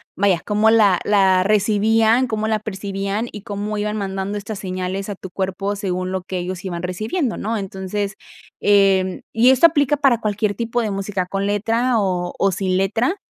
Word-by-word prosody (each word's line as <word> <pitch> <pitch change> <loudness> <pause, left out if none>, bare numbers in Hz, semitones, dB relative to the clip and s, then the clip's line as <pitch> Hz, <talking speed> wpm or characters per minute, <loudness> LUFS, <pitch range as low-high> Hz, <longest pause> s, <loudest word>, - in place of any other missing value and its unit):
vaya, 190 -3 +2
cómo 210 +1 +3
la 205 -5 +4
la 190 -3 +3
recibían, 220 +4 +3
cómo 220 -1 -2
la 220 -1 +1
percibían, 200 +1 -3
y 210 - -8
cómo 210 -1 -4
iban 210 +1 -2
mandando 195 0 -3
estas 205 +1 -6
señales 185 0 -4
a 205 - -4
tu 190 - -9
cuerpo 195 +2 -2
según 185 -2 -3
lo 190 - -2
que 190 0 -5
ellos 180 0 -5
iban 175 -2 -4
recibiendo, 220 - -2
¿no? 225 +2 -2
Entonces, 195 +1 -4 0.5
em, 195 -2 +3
y 235 +3 +5
esto 265 +6 +7
aplica 295 -2 +1
para 265 -5 +3
cualquier 210 -1 -1
tipo 235 +2 -1
de 220 - -1
música 195 -1 -2
con 195 +1 -2
letra 225 +4 +1
o 180 -3 -1
o 195 - +3
sin 185 0 -1
letra, 220 - +1
205 Hz, 180 wpm, -20 LUFS, 190-220 Hz, 0.5 s, esto